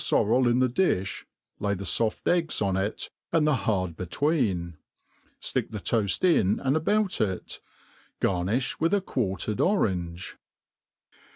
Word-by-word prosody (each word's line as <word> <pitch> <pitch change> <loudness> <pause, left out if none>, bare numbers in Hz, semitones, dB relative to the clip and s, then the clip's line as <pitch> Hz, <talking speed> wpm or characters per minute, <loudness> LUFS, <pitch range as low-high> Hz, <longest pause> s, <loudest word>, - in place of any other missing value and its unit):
forrel 125 +4 +3
in 120 - +2
the 130 0 +3
ciiih, 120 - 0 0.3
lay 100 0 0
the 100 - -6
fott 110 +5 -1
eggs 170 -2 +1
on 100 -2 0
it, 95 +2 -2 0.2
and 160 -2 +3
the 150 - +3
hard 95 -9 -1
between; 95 - -1 0.6
fticfc - - -2
the 105 - -5
toaft 105 - 0
in 110 - +3
and 135 +1 +1
about 205 +5 +1
ic. 95 -4 -2 0.6
Garnifh 100 +8 0
with 190 +4 +1
quartered 105 -2 -1
orange. 95 - -1
110 Hz, 130 wpm, -27 LUFS, 95-150 Hz, 0.6 s, forrel